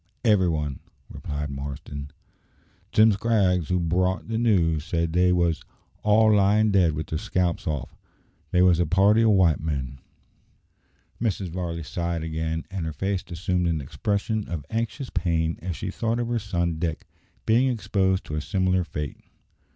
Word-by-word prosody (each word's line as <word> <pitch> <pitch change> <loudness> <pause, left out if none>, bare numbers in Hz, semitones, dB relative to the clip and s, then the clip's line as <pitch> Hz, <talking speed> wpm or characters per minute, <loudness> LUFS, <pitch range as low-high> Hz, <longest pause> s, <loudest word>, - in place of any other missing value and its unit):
"Every 100 -5 +4
one," 75 -4 -2 0.3
replied 75 0 -5
Marston. 70 +1 -6 0.8
"Jim 110 +1 +6
Scraggs, 95 -5 +1
who 90 0 +2
brought 90 +4 0
the 115 0 -1
news, 85 -10 +2
said 85 0 -1
they 90 +1 +4
wos 85 -2 +1 0.4
all 110 +1 +4
lying 105 +2 +4
dead 90 -5 +3
with 75 +1 -3
their 80 - -3
scalps 90 -2 -1
off. 70 -5 -3 0.5
They 90 +3 +3
wos 90 -2 +5
a 85 - +2
party 100 +6 +4
o' 115 - +4
white 95 -7 +4
men." 70 -4 -4 1.2
Mrs. 100 -5 -1
Varley 85 -1 -4
sighed 85 +2 -3
again, 80 0 -3
and 90 -4 -3
her 80 - -4
face 95 +2 -2
assumed 90 +1 -1
an 80 -2 0
expression 105 - -2
of 80 -5 -4
anxious 115 +4 -3
pain 85 -2 0
as 90 -1 -4
she - - -4
thought 115 +1 -1
of 120 -1 -2
her 120 -1 0
son 85 -6 -2
Dick 80 -2 -3 0.4
being 120 +4 +4
exposed 100 -5 0
to - - -7
a 75 - -1
similar 95 +2 +1
fate. 75 -4 -5
90 Hz, 160 wpm, -25 LUFS, 80-100 Hz, 1.2 s, Jim